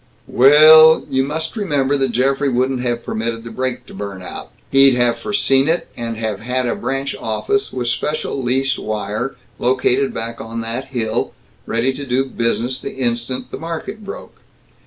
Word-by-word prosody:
"We 130 +3 +5
ul, 155 +1 +8
you 130 - +2
must 160 +3 -4
remember 145 - 0
that 135 -2 0
Geoffrey 135 +4 +1
wouldn't 130 0 0
have 120 -1 -2
permitted 115 +1 -3
the 115 - -8
brake 125 +1 -3
to - - -14
burn 100 -2 -6
out. - - -8 0.2
He'd 135 -1 +6
have 120 -1 +1
foreseen 135 -9 +2
it, 165 +2 0
and 115 -1 -4
have 110 -3 -3
had 125 +3 -1
a 120 - 0
branch 135 +1 -3
office, 110 - -1
with 125 -2 -3
special 140 +3 -2
leased 130 +2 0
wire, 110 +4 -3 0.2
located 130 +2 +1
back 115 +1 -5
on 115 +1 -5
that 115 +4 -4
hill, 120 -5 -2 0.3
ready 115 +4 0
to 140 - -6
do 130 +2 +1
business 120 0 -2
the - - -6
instant 125 0 -2
the - - -6
market 170 +6 -6
broke. 200 - -9
130 Hz, 175 wpm, -19 LUFS, 115-135 Hz, 0.3 s, ul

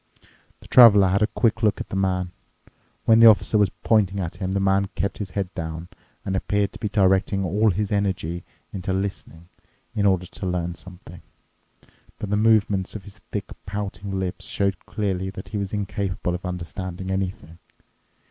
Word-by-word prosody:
'" - - -34
The - - -14
Traveler 105 -6 +8
had 100 +3 +1
a 105 - +4
quick 115 -1 0
look 105 -3 +2
at - - -6
the - - -4
man. 90 -2 0 0.7
When 115 0 +6
the 115 - +9
Officer 110 0 +5
was 100 -2 +4
pointing 100 -3 +2
at 85 -3 -4
him, 95 +1 -3
the - - +2
man 95 0 +2
kept 100 - -2
his 100 -3 -4
head 95 -2 -2
down 80 0 -5 0.4
and 95 - -1
appeared 100 +1 0
to - - -10
be 105 - -2
directing 95 -1 +2
all 105 +5 +2
his 100 +2 -1
energy 95 -4 -1 0.3
into 95 -1 -3
listening 95 -3 -4 0.5
in 100 -1 +2
order 95 -2 +2
to 95 +2 -8
learn 90 -1 -2
something. 90 -1 -12 1.0
But 105 - -5
the - - +3
movements 105 -3 +2
of 105 - -6
his 100 +1 -13
thick 100 -2 -4 0.2
pouting 100 -1 -4
lips 95 -2 -4
showed 100 -2 -2
clearly 95 -3 -2
that 95 0 -9
he 105 - -4
was 100 -1 -3
incapable 100 -3 -2
of 90 +1 -4
understanding 90 +1 -5
anything. 90 -4 -4
95 Hz, 180 wpm, -24 LUFS, 90-105 Hz, 1.0 s, the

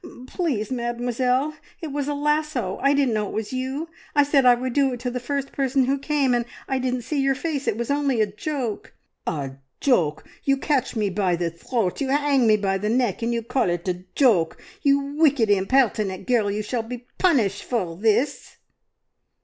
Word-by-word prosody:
"P 345 - -9 0.2
please, 260 - -2
Mademoiselle, 250 +3 0 0.3
it 320 -4 -6
was 285 0 -2
a 290 - -1
lasso! 295 -8 -1
I 275 +1 +4
didn't 275 -4 +2
know 210 -1 0
it - - -7
was 220 +3 -3
you. 265 +5 -3 0.3
I 290 - +6
said 280 -2 +3
I 245 - +8
would 250 +1 -3
do 275 -1 +2
it 245 - -5
to 250 -1 -2
the 250 - -3
first 275 +2 -3
person 270 -1 +1
who 275 +2 0
came, 280 -2 +1
and 240 -1 +1 0.2
I 265 -1 0
didn't 250 -1 -1
see 280 +4 -1
your 270 0 +2
face. 285 -1 -3
It 210 - +1
was 235 +3 -2
only 280 -4 +1
a 215 - +4
joke." 230 +2 -4 0.3
"A 140 -5 -3 0.2
joke! 170 - +1 0.2
You 275 0 +2
catch 270 -3 0
me 210 -3 0
by 185 -2 +1
the 170 -1 -2
throat, 185 - -2
you 270 - -1
'ang 280 -3 +3
me 215 -1 +5
by 195 -1 0
the 210 +2 -1
neck, 240 -3 +1
and 230 +1 0
you 235 -1 -1
call 235 -3 0
it 175 +1 -2
a 180 0 -2
joke! 200 - +3 0.2
You 280 -1 +4 0.2
wicked, 275 -9 +4
impertinent 205 -2 +2
girl, 235 -5 +2
you 210 +1 -2
shall 235 +2 -2
be 240 +2 -8
punished 250 - +2
for 185 -9 -2
this!" 225 - 0
250 Hz, 205 wpm, -24 LUFS, 210-275 Hz, 0.3 s, I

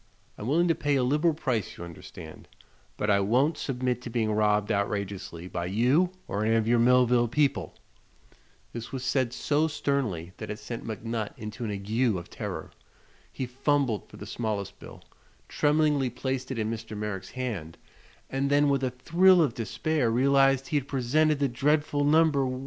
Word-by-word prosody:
I'm 105 - -6
willing 170 +6 +3
to 165 - +4
pay 145 -2 0
a 130 - +2
liberal 150 +5 +2
price, 125 - -2
you - - -7
understand, 80 -2 -11 0.5
but 105 0 +1
I 100 - +4
won't 125 +10 +2
submit 125 -4 -2
to 125 - -7
being 115 -2 0
robbed 105 0 +2
outrageously 100 -4 -3
by 85 -1 -3
you 125 - +2 0.2
or 105 - -2
any 110 +1 +2
of 110 -1 +1
your 120 0 +4
Millville 125 0 +4
people." 140 +4 0 1.0
This 115 0 -6
was 130 -2 -4
said 130 -2 +1
so 150 +4 +1
sternly 125 - -2
that 110 - -7
it 105 - -4
sent 115 +1 -7
McNutt 110 0 -4
into 105 +2 -7
an - - -3
ague 105 +3 0
of 85 - -9
terror. - - -6 0.6
He 130 - -4
fumbled 130 -2 0
for - - -13
the 105 - -8
smallest 105 -3 -4
bill, - - -12 0.4
tremblingly 150 -3 +2
placed 130 +1 -3
it 130 - -4
in 110 0 -1
Mr. 110 -1 -6
Merrick's 105 -3 -4
hand, 100 -11 -4 0.5
and 135 +1 -1
then 145 0 +4
with 140 -1 +1
a 130 - +1
thrill 175 +9 +4
of 150 -8 +3
despair 120 +4 -1
realized 135 +2 +3
he 150 - +1
had 140 -1 -2
presented 145 +4 +2
the 140 0 +1
dreadful 145 +3 +1
No. 155 +3 +5
1! 135 -4 0
125 Hz, 175 wpm, -27 LUFS, 110-140 Hz, 1.0 s, No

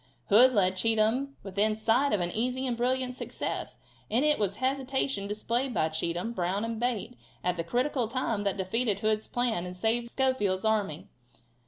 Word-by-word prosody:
Hood 245 +5 +7
led 190 -3 +2
Cheatham 225 +6 +1
within 205 +2 +1
sight 230 +6 +2
of 205 - +1
an 175 0 -1
easy 250 +5 -1
and 245 -2 -1
brilliant 250 +1 0
success, - - -4 0.3
and 245 +7 +2
it 300 0 +3
was 200 -2 +1
the 210 - -14
hesitation 265 -4 -1
displayed 235 +4 -1
by 160 - +2
Cheatham. 170 +7 -2
Brown 190 +2 -1
and 230 -1 -4
Bate 240 -1 -2 0.3
at 180 0 +1
the 165 - -2
critical 245 - 0
time, 230 -3 -1
that 200 -1 0
defeated 200 +2 0
Hood's 215 0 0
plan 240 -7 -1
and 180 0 -6
saved 230 +5 0
Schofield's 225 -8 0
army. 200 -5 0
225 Hz, 175 wpm, -29 LUFS, 200-250 Hz, 0.3 s, Hood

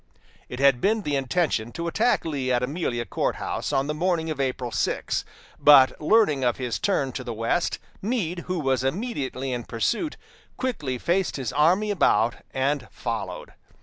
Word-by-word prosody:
It 125 - -6
had 135 -3 +4
been 215 +1 +2
the 145 -4 -1
intention 135 -4 0
to 170 - -4
attack 225 +6 +1
Lee 140 -5 -1
at 125 0 +2
Amelia 125 -4 -2
Court - - -1
House - - -3
on 135 - +1
the 150 - -2
morning 165 0 0
of 145 -3 -2
April 130 -2 -2
6, 105 - -1 0.4
but 140 -2 +6
learning 155 -6 +3
of 120 -2 +1
his 125 -3 -3
turn 165 -10 0
to 130 - -5
the 120 -2 -5
west, 115 +10 0 0.2
Meade, 185 -6 -2
who 180 -1 -1
was 135 -4 +1
immediately 135 - -2
in 120 -1 -3
pursuit, 230 - -1 0.4
quickly 150 - -2
faced 180 +8 0
his 130 -5 -3
army 180 +8 +3
about 120 - +2
and 135 0 -1
followed. - - -5
145 Hz, 170 wpm, -25 LUFS, 130-180 Hz, 0.4 s, but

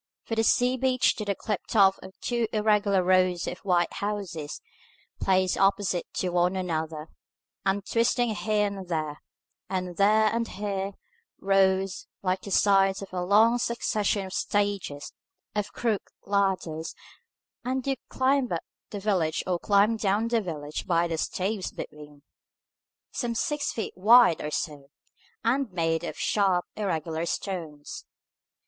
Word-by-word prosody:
From 225 - -4
the 225 - +3
sea 250 +3 +3
beach 255 0 +2
to 210 - -4
the 200 -1 0
cliff 210 -2 -2
top 195 -3 +4 0.2
two 240 -2 0
irregular 210 -3 +2
rows 185 -1 +3
of 180 - -5
white 175 -3 +1
houses, 195 -8 -4 0.6
placed 185 -1 +2
opposite 195 -2 +1
to 185 - -1
one 180 +1 +2
another, 160 -4 -3 0.6
and 195 0 0
twisting 235 0 +1
here 210 0 +1
and 195 -2 -5
there, 155 -3 -3 0.5
and 185 -2 -3
there 215 +2 +4
and 230 0 0
here, 200 -1 -3 0.5
rose, 195 -1 +2 0.2
like 185 0 0
the - - -8
sides 195 0 +3
of 195 - -11
a 180 - -1
long 220 +6 +4
succession 215 -4 0
of 190 - -8
stages 200 -8 -1 0.4
of 210 -1 -2
crooked 225 -4 -2 0.2
ladders, 190 -5 -1 0.7
and 255 +1 -2
you 275 -1 +1
climbed 260 -1 +1
up 170 - -2 0.3
the 205 - -5
village 185 -6 0
or 180 -2 0
climbed 205 +4 +3
down 210 +2 +1
the 230 -1 +2
village 155 -5 -5
by 170 -2 +2
the 165 -1 -3
staves 190 +3 -2
between, 150 -1 -10 0.9
some 235 -2 -2
six 295 +5 -1
feet 225 - -4
wide 220 -1 +6
or 150 - -3
so, 145 -2 -4 0.5
and 250 0 +1
made 165 -2 0
of - - -5
sharp 190 -4 +1
irregular 165 -5 -2
stones. 160 -8 -5
195 Hz, 140 wpm, -27 LUFS, 175-215 Hz, 0.9 s, wide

